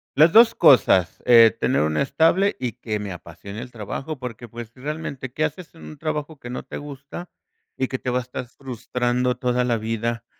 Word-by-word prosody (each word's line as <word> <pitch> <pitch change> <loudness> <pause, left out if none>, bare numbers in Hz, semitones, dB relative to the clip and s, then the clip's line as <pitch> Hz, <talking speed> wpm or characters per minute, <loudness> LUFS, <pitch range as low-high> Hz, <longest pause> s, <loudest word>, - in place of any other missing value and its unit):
Las 155 +4 +6
2 230 +1 +7
cosas, 125 - +4
eh, 115 -2 +7
tener 130 - +1
una 75 0 0
estable 165 +8 +2
y 125 -3 -3
que 110 -3 -4
me 100 -3 -5
apasione 90 +6 -9
el 125 0 -9
trabajo. 130 +6 -6
Porque, 120 -2 -7
pues, 115 -1 -8
realmente, 140 -2 -5
qué 155 +4 0
haces 160 +3 -7
en 165 - -15
un 155 - -10
trabajo 155 0 -4
que 120 - -10
no 125 - -5
te - - -9
gusta, 145 +4 -9 0.5
y 130 - 0
que 130 - -3
te 125 - -4
va 125 +1 +1
a - - -3
estar 125 +1 -6
frustrando 125 -1 -2
toda 125 0 0
la 120 -2 +1
vida, 115 +1 -3
125 Hz, 200 wpm, -23 LUFS, 115-145 Hz, 0.5 s, 2